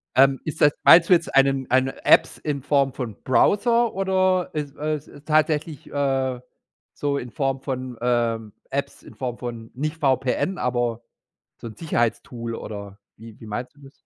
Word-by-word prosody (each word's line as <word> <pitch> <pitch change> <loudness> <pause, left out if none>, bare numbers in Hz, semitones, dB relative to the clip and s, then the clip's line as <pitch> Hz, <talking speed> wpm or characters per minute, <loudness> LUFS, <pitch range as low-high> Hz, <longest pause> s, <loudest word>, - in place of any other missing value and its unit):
Ähm, 135 0 +5
ist 155 - -5
das 145 - +6
meinst 165 0 +7
du - - +7
jetzt 170 -1 +1
einen 135 -1 +3
eine 130 +1 +1
Apps - - +5
in 145 -2 -3
Form 140 -1 +1
von 120 -6 -5
Browser 230 - +3
oder 185 -1 +1
ist 145 -3 -4
äh, 150 -1 -4
tatsächlich, 155 -1 0
äh, 135 -3 0 0.5
so 145 -1 -1
in 125 -3 -6
Form 135 -3 -1
von, 130 -2 -5
ähm, 115 -3 0 0.2
Apps, - - -4
in - - -15
Form 125 -2 -4
von 115 -2 -7
nicht 150 +4 -3
VPN, 135 +6 0
aber 120 -2 -1 0.6
so - - -8
'n 110 -2 -9
Sicherheitstool 120 -5 -2
oder 100 -2 -8 0.2
wie 110 0 -12
wie 110 - -12
meinst 120 +6 -6
du 145 - -20
das? 135 - -13
135 Hz, 165 wpm, -23 LUFS, 120-150 Hz, 0.6 s, meinst